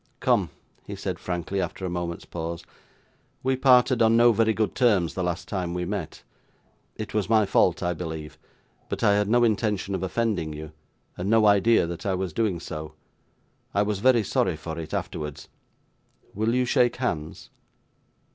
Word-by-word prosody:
'Come!' - - +2 0.3
he - - -7
said, - - -4
frankly, 90 +2 -3
after 90 +1 -4
a - - -2
moment's 85 -1 -4
pause, 85 0 -5 0.8
'we 130 0 +2
parted 125 -2 +4
on 115 0 +5
no 120 0 +6
very 110 0 +2
good 110 -1 -1
terms 100 -10 +2
the 95 - -3
last 90 -1 -3
time 90 -3 -3
we 90 0 -2
met; 95 -3 -5 0.7
it 110 - -6
was 105 -1 -1
my 110 -2 +4
fault, 95 -2 +2
I 90 0 0
believe; 80 -2 -7 0.5
but - - -3
I 100 - +5
had 105 0 +1
no 120 +2 +4
intention 105 -3 0
of 95 - -2
offending 95 -5 -1
you, 75 0 -8 0.5
and 90 +3 -3
no 110 -1 +4
idea 105 0 +4
that 85 0 -6
I 95 - +1
was 90 -3 -3
doing 105 -5 0
so. 75 -1 -7 0.8
I 100 - +4
was 105 -1 -2
very 120 0 +4
sorry 90 -3 0
for 80 +1 -6
it, 80 - -7
afterwards. 75 -1 -5 0.8
Will 110 +4 0
you 125 0 +2
shake 120 0 +2
hands? 80 -11 -4
95 Hz, 175 wpm, -25 LUFS, 85-110 Hz, 0.8 s, no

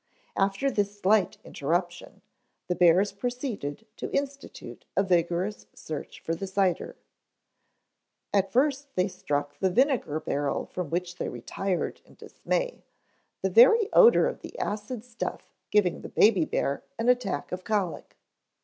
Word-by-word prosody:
After 200 +8 +1
this 205 -2 -1
slight 200 -1 +3
interruption, 175 +4 -3 0.4
the 180 - 0
bears 180 +3 +4
proceeded 225 - -4
to - - -5
institute 280 0 -5
a 195 - +5
vigorous 180 +2 0
search 155 -2 -7
for 165 - -2
the 195 +4 -4
cider. 190 -2 0 1.4
At 195 -1 +2
first 280 +3 +1
they 185 +1 +2
struck 145 -6 -3
the 190 - +2
vinegar 240 - +1
barrel 145 -2 -2
from 180 -4 -5
which 175 +2 -3
they - - -3
retired 195 -3 -3
in - - -21
dismay, - - -3 0.6
the 190 - +1
very 325 - +7
odor 475 0 +7
of - - -4
the - - -10
acid 215 - -4
stuff 240 -2 -6 0.2
giving 195 -4 +2
the - - -8
baby 200 -7 +4
bear 140 -2 -1
an 230 - -1
attack 245 -12 +1
of 180 0 -4
colic. 195 -3 -2
195 Hz, 140 wpm, -27 LUFS, 175-235 Hz, 1.4 s, very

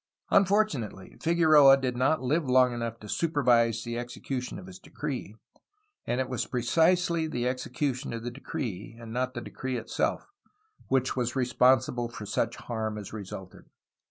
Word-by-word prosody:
Unfortunately, 190 - +1
Figueroa 155 -5 +6
did 130 -2 -2
not 130 +4 +1
live 145 +2 0
long 125 -1 +5
enough 115 -1 -4
to 105 - -9
supervise 120 -7 +2
the 120 0 -3
execution 125 +2 -5
of 185 - -9
his 185 0 -11
decree, 140 - -5 0.7
and 120 - 0
it 130 - 0
was 125 -3 -2
precisely 165 +6 +2
the 125 -5 -2
execution 130 +1 -2
of 115 -1 -5
the 120 - -4
decree, 120 - -6
and 115 -1 -9
not 130 +1 -1
the 120 - -3
decree 130 +1 -4
itself, 115 - -1 0.6
which 130 -1 +1
was 120 -1 -1
responsible 125 -1 +2
for 110 -3 -8
such - - -1
harm 110 -2 -4
as 105 -1 -8
resulted. 95 -3 -8
125 Hz, 155 wpm, -28 LUFS, 115-145 Hz, 0.7 s, Figueroa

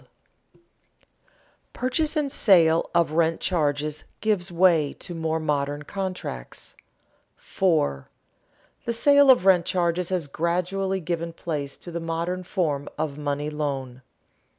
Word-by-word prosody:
[Sidenote: - - -31 1.1
Purchase 295 +5 0
and 290 -2 0
sale 165 -8 +4
of 170 -3 +3
rent 165 +1 +1
charges 150 -3 -1 0.2
gives 200 -5 0
way 170 -4 +3
to 175 - -6
more 160 -1 -1
modern 145 -1 -1
contracts] 185 - -5 0.6
4. 110 - 0 0.8
_The 235 - 0
sale 285 +3 +5
of 250 -8 +6
rent 180 -3 +5
charges 175 -1 0
has 180 -4 -1
gradually 180 +5 -1
given 170 0 -3
place 145 -5 -4
to 175 - -10
the 170 - -3
modern 165 +2 -3
form 160 -6 -2
of 150 -1 -3
money 145 +1 -2
loan. 135 -4 -4
170 Hz, 125 wpm, -25 LUFS, 150-185 Hz, 1.1 s, of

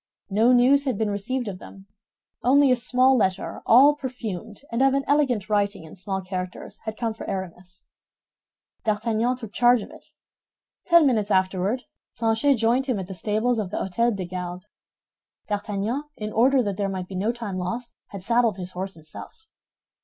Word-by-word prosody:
No 220 +5 +4
news 260 +3 +5
had 255 -6 -1
been 215 -1 0
received 240 +5 -2
of 190 -3 -5
them; 195 -1 -13 0.6
only 275 +2 +5
a 250 - +4 0.2
letter, 250 -8 +2
all 270 +6 +7
perfumed 240 -6 -6
and 230 +2 0
of 270 0 +4
an 275 - +1
elegant 270 -8 +1
writing 205 -3 0
in 160 - -12
small 190 0 -3
characters, 185 -1 -6
had 220 -1 -5
come 230 -2 -1
for 220 - -8
Aramis. 180 -1 -7 1.0
D'Artagnan 225 +3 0
took 225 -5 -9
charge 245 -2 +4
of - - -11
it. - - -14 0.8
Ten 340 -3 +6
minutes 220 -6 +2
afterward 190 +5 +1 0.3
Planchet 225 +5 +2
joined 240 +4 +1
him 250 -5 0
at 190 - -4
the 190 - -8
stables 220 +5 0
of 205 -4 -3
the - - -4
Hôtel 230 +4 0
des 190 -2 -4
Gardes. 180 +1 -6 0.8
D'Artagnan, 210 +6 -2
in 215 0 -5
order 255 +3 +4
that 200 -3 -3
there 200 -1 -1
might 185 -2 -4
be 195 - -10
no 195 +5 0
time 230 -6 -5
lost, 235 +7 -4
had 200 -3 -9
saddled 230 -1 +2
his 180 -1 -6
horse 190 +2 -5
himself. 160 - -11
215 Hz, 175 wpm, -24 LUFS, 190-245 Hz, 1.0 s, all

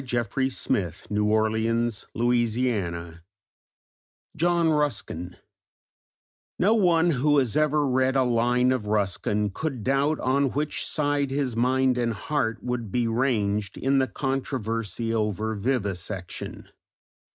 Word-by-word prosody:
CHAPTER 120 0 -2
VI: 90 -9 0 0.2
JOHN 110 +2 +1 2.8
RUSKIN 115 - -1 1.2
No 205 +5 +3
one 175 -6 +3
who 145 +1 +2
has 130 -6 +2
ever 150 -1 +2
read 130 +1 +2
a 135 - +4
line 125 +1 +2
of 125 -5 -1
Ruskin 105 0 0
could 135 0 -4
doubt 140 +4 +1
on 135 +1 +1
which 150 +2 -1
side 145 -2 0
his 135 -3 -1
mind 130 +1 +2
and 115 -1 0
heart 115 -1 -2
would 125 -4 -3
be 120 +1 +1
ranged 110 -4 0
in 135 +1 +2
the 130 - +2
controversy 115 - -2
over 110 0 -1
vivisection. 100 -5 -3
125 Hz, 105 wpm, -25 LUFS, 110-135 Hz, 2.8 s, a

